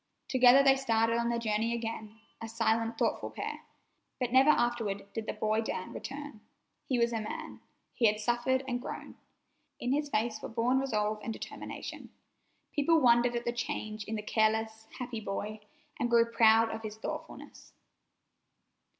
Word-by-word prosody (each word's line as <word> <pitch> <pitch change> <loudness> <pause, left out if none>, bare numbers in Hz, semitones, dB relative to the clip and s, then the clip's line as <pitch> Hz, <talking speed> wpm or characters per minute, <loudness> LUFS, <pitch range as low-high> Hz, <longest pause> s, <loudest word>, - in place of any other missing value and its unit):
Together 255 +1 +6
they 270 -1 +6
started 230 -3 +1
on 235 0 0
their 235 - 0
journey 225 0 0
again, 225 -1 -5 0.2
a 225 - -4
silent, 230 0 0
thoughtful - - 0
pair. - - -5 0.6
But 250 -2 -1
never 265 +3 +6
afterward 235 -7 +1
did 225 -1 -4
the - - -1
boy 215 +1 0
Dan 185 -4 -4
return. 280 -5 -7 0.5
He 255 - +1
was 235 0 +2
a 225 - -1
man. 215 - -7 0.3
He 230 - +3
had 210 0 +1
suffered 240 +4 +1
and 245 -1 -2
grown. - - -7 0.7
In 245 - -1
his 295 0 0
face 220 -2 -1
were - - -6
born 240 +3 +1
resolve 215 -5 -1
and 225 - -4
determination. - - -7 0.6
People 320 +2 +3
wondered 240 -2 +4
at 240 - -3
the 240 - 0
change 215 -2 -4
in 220 - -4
the 210 - -4
careless, 220 0 0
happy 245 -2 -4
boy, 210 +1 -4 0.4
and 240 - 0
grew 235 -1 +5
proud 225 0 +5
of 220 - -5
his 215 -1 -7
thoughtfulness. 220 - -8
230 Hz, 165 wpm, -31 LUFS, 220-245 Hz, 0.7 s, Together